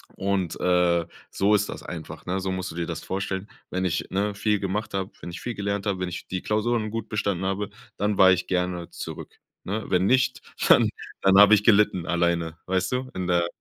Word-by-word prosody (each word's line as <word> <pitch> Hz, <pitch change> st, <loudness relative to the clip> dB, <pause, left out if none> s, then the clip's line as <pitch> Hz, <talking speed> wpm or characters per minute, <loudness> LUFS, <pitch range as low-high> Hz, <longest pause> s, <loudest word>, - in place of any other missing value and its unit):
Und, 95 Hz, -3 st, -1 dB
äh, 90 Hz, -2 st, +3 dB, 0.3 s
so 100 Hz, +2 st, +3 dB
ist 105 Hz, 0 st, +1 dB
das -, -, -6 dB
einfach, 80 Hz, -2 st, -8 dB
ne? 95 Hz, +2 st, 0 dB
So 95 Hz, 0 st, -2 dB
musst 95 Hz, 0 st, -3 dB
du -, -, -10 dB
dir 85 Hz, 0 st, -2 dB
das -, -, -5 dB
vorstellen, 95 Hz, +1 st, -3 dB, 0.2 s
wenn 95 Hz, 0 st, -1 dB
ich, 85 Hz, -2 st, -1 dB
ne, 100 Hz, +2 st, 0 dB
viel 105 Hz, 0 st, +1 dB
gemacht 105 Hz, +3 st, -3 dB
habe, 95 Hz, 0 st, -2 dB
wenn 85 Hz, -, -6 dB
ich 85 Hz, -, -8 dB
viel 120 Hz, -1 st, -4 dB
gelernt 100 Hz, 0 st, -2 dB
habe, 95 Hz, -2 st, 0 dB
wenn 90 Hz, -1 st, -2 dB
ich 90 Hz, -, -7 dB
die 95 Hz, -1 st, -4 dB
Klausuren 110 Hz, 0 st, 0 dB
gut 115 Hz, -1 st, -4 dB
bestanden 100 Hz, -4 st, -1 dB
habe, 100 Hz, +2 st, -1 dB, 0.3 s
dann 105 Hz, 0 st, 0 dB
war 95 Hz, 0 st, +8 dB
ich 90 Hz, 0 st, +1 dB
gerne 90 Hz, -2 st, -1 dB
zurück, -, -, -8 dB, 0.2 s
ne? 110 Hz, +3 st, -3 dB
Wenn 90 Hz, 0 st, +2 dB
nicht, 130 Hz, +4 st, +2 dB, 0.3 s
dann -, -, +7 dB, 0.3 s
dann 95 Hz, 0 st, +6 dB
habe 105 Hz, +1 st, +9 dB
ich 105 Hz, -, 0 dB
gelitten 105 Hz, -5 st, +4 dB
alleine, 85 Hz, -2 st, 0 dB
weißt 95 Hz, 0 st, 0 dB
du, 130 Hz, +1 st, -2 dB
in 90 Hz, -1 st, -2 dB
der 85 Hz, -1 st, +2 dB
95 Hz, 215 wpm, -25 LUFS, 90-105 Hz, 0.3 s, habe